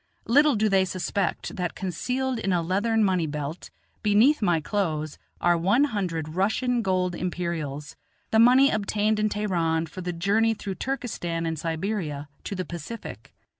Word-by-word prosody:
Little 290 +3 +5
do 215 +1 +2
they 195 -2 +4
suspect 185 +1 -2
that 180 -2 -2
concealed 250 +8 -2
in 195 -3 -1
a 175 -2 +1
leathern 210 +6 +1
money 185 -5 +2
belt 150 +2 -5 0.3
beneath 225 +8 +4
my 175 -5 +3
clothes 155 -4 -2 0.2
are 175 0 +3
one 195 +11 +3
hundred 180 - -2
Russian 220 +8 +1
gold 185 -3 0
Imperials, 165 -6 -4 0.4
the 220 - +4
money 255 +4 +6
obtained 215 0 0
in 215 0 +2
Teheran 170 -6 0
for 175 +3 -8
the 180 0 -3
journey 205 +6 +2
through 200 -2 -5
Turkestan 195 -11 -3
and 160 -2 -2
Siberia 160 -3 -3 0.2
to 200 - -4
the 185 -1 -3
Pacific. 170 +8 -8
190 Hz, 155 wpm, -26 LUFS, 165-220 Hz, 0.4 s, money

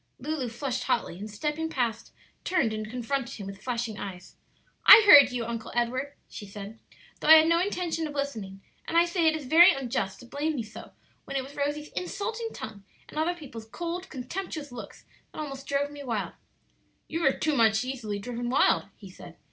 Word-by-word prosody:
Lulu 280 -2 -3
flushed 250 +2 -3
hotly, 185 -5 -1
and 210 +2 -6
stepping 300 +9 -3
past 235 -6 -2 0.3
turned 320 -12 +1
and 215 0 -5
confronted 250 +2 -3
him 200 - -8
with 195 0 -9
flashing 235 -3 -3
eyes. 185 -2 -8 0.5
"I 445 - +11
heard 285 -9 +10
you, 245 -2 -3
Uncle 230 -1 -5
Edward," 255 +4 -1
she 205 - -9
said, 205 +2 -9 0.4
"though - - -4
I 320 - +11
had 315 0 +6
no 335 0 +4
intention 350 -4 -2
of 295 - -9
listening; 220 -9 -4 0.3
and 335 - 0
I 340 - +6
say 340 -1 +1
it 315 - +3
is 305 -3 -6
very 335 +7 +8
unjust 240 -7 -3
to - - -12
blame 295 +5 -2
me 240 - -2
so 215 - -11 0.3
when 275 - -3
it 265 - -1
was 275 +2 -12
Rosie's 290 +1 -2
insulting 450 +5 -4
tongue 205 -2 -8 0.3
and 305 - -5
other 340 +3 +1
people's 240 -9 -10
cold, 345 +8 -5
contemptuous 290 +2 -6
looks 245 - -10 0.3
that - - -8
almost 275 -2 -6
drove 285 +1 0
me 290 -1 -9
wild." 215 -8 -3 0.7
"You 330 +1 -3
are 270 - +2 0.2
much 220 -3 +4
too - - -7
easily 225 -6 -4
driven 240 +3 -4
wild," 260 - +3
he 195 -3 -12
said. 170 -2 -13
265 Hz, 195 wpm, -27 LUFS, 225-315 Hz, 0.7 s, I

